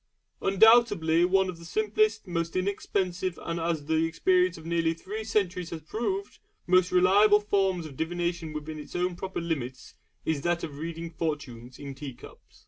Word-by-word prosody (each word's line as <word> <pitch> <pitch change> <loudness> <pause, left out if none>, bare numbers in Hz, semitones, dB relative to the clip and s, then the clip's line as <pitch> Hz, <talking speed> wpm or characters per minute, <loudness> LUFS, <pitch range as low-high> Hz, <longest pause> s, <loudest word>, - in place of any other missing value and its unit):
Undoubtedly 195 -5 +5
one 190 +1 +3
of 180 -2 -6
the - - -12
simplest, 215 +4 +1
most 170 -2 -3
inexpensive 185 -1 -1
and, 165 0 -3
as 165 -3 -1
the 160 +1 +2
experience 365 - +2
of 160 - -12
nearly 165 -1 +1
three 210 +6 -6
centuries 185 -5 -1
has 160 -2 -7
proved, 380 - -3 0.3
most 185 0 +4
reliable 200 +4 +5
forms 195 -4 0
of 145 -3 -9
divination 170 +1 -2
within 155 0 -6
its 150 - -10
own 180 0 0
proper 190 +2 -4
limits, 135 -7 -4 0.3
is 155 -3 0
that 175 +2 0
of 145 -3 -6
reading 165 +1 -5
fortunes 140 -7 -5
in 140 -1 -7
tea 135 -2 -8
cups. - - -16
170 Hz, 165 wpm, -28 LUFS, 160-195 Hz, 0.3 s, Undoubtedly